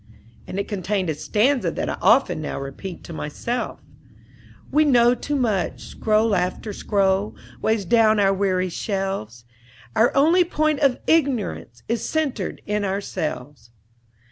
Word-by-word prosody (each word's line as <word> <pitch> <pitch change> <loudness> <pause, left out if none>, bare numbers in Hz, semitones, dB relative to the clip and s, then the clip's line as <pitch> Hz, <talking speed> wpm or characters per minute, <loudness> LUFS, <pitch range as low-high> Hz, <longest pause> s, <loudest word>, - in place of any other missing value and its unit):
and 195 - -4
it 200 - -2
contained 190 -3 -1
a - - -1
stanza 240 - +1
that - - -3
I - - -2
often 265 - +3
now 150 - -4
repeat 140 +7 -7
to 170 - -9
myself: 200 +11 -4 0.9
"We 305 - +4
know 245 -4 +5
too 285 +4 -3
much: 220 -9 -1
scroll 215 0 +1
after 185 +3 -1
scroll 195 0 0 0.3
Weighs 220 -3 +1
down 220 0 +4
our 195 -1 +4
weary 185 -2 0
shelves: 185 - -4 0.5
Our 230 - +4
only 325 +6 +5
point 310 -3 0
of 275 -3 +3
ignorance 250 - 0
Is 230 0 -1
centred 280 - -2
in 210 0 -1
ourselves." 150 - -4
205 Hz, 140 wpm, -23 LUFS, 185-245 Hz, 0.9 s, know